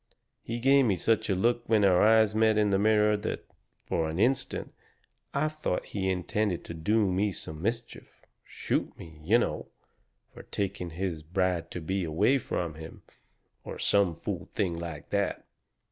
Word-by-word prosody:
He 115 - -4
gave 135 +2 +5
me 105 -5 +2
such 110 +4 +1
a 95 - +2
look 120 +5 +2
when 110 -3 +4
our 90 -2 +5
eyes 110 -1 +5
met 110 0 +3
in 105 -1 +3
the 95 - +3
mirror 105 0 +4
that, 105 - -4 0.4
for 80 -1 -1
an 80 - -4
instant, 125 +7 0 0.6
I 145 +2 +1
thought 155 -11 -2
that - - -16
he 95 -2 -2
intended 95 +1 -1
to - - -7
do 100 +5 +1
me 100 +3 +1
some 80 -3 -7
mischief 115 +4 -5 0.2
shoot - - -3
me, 80 -2 -12
you 105 +9 +4
know, 120 - -2 0.7
for - - -10
taking 95 -3 -4
his 85 -1 -3
bride 90 0 -1
to 90 - -6
be 95 +4 -2
away 85 - +2
from 85 -8 -3
him, 80 +1 -11 0.6
or - - -7
some 100 -5 +2
fool 90 +2 -5
thing 95 -5 0
like 85 -3 -7
that. - - -1
100 Hz, 175 wpm, -28 LUFS, 85-110 Hz, 0.7 s, gave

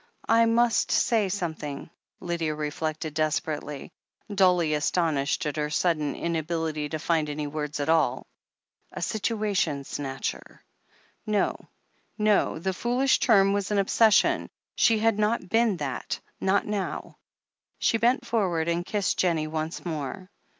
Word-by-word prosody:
"I 230 0 +5
must 230 -1 +2
say 220 -5 +2
something," 160 -6 -4 0.3
Lydia 170 -3 -2
reflected 155 +1 -3
desperately, 150 -2 -2 0.4
dully 180 -5 +3
astonished 150 0 0
at 150 0 -3
her 150 0 -1
sudden 155 -1 0
inability 160 -2 -2
to 155 - -3
find 155 -1 0
any 150 0 -3
words 150 0 -4
at 145 - -1
all. 160 -6 +2 0.7
A - - -5
situation 205 -9 -1
snatcher. 135 -1 -5 0.6
No— 210 -1 0 0.5
no— 210 -5 +2
the 190 +4 -2
foolish 250 +7 +1
term 195 -4 +4
was 200 -1 -1
an 210 - 0
obsession; 210 +2 +3 0.2
she 225 - +3
had 220 -1 +2
not 210 -3 0
been 225 -4 +2
that 135 -5 -4
— - - -43
^not 195 +1 +2
now 205 -2 -4 0.6
She 225 - +1
bent 245 +4 +2
forward 180 -8 0
and 170 +1 0
kissed 205 +1 -1
Jennie 165 -4 +2
once 155 +2 -4
more. 165 +4 -5
170 Hz, 135 wpm, -26 LUFS, 155-205 Hz, 0.7 s, I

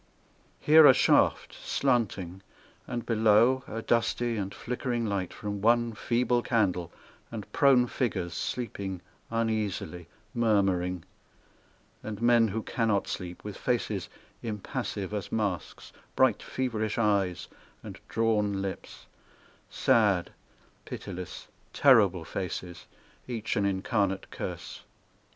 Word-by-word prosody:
Here 155 0 +8
a 130 - +8
shaft, - - +3
slanting, 95 -6 -1 0.5
and 120 -2 -4
below 115 +3 +4
A 115 0 -5
dusty 120 0 +1
and 100 -2 -3
flickering 120 0 -3
light 100 -4 -2
from 105 -1 -5
one 120 +1 +3
feeble 120 +2 +1
candle 95 -9 0 0.4
And 110 -3 -8
prone 135 -3 +5
figures 95 -9 -2
sleeping 100 -5 -4 0.3
uneasily, 110 -6 -2 0.3
Murmuring, 95 -6 +1 1.0
And 105 -2 -6
men 120 -1 +4
who 110 +2 -3
cannot 110 -5 0
sleep, 90 -1 -6
With 105 -2 -6
faces 110 -6 -2 0.3
impassive 105 -2 -4
as 105 -3 -4
masks, 100 -5 -3 0.2
Bright, - - +3
feverish 110 -5 -2
eyes, 100 -6 +1 0.4
and - - -9
drawn 105 -3 +1
lips, 95 -1 -6 0.6
Sad, 105 -8 +2 0.5
pitiless, 90 -3 -7 0.3
terrible 100 - +5
faces, 90 0 -5 0.4
Each 115 -3 -3
an 100 - +1
incarnate 95 0 -1
curse. - - -6
105 Hz, 105 wpm, -28 LUFS, 95-120 Hz, 1.0 s, Here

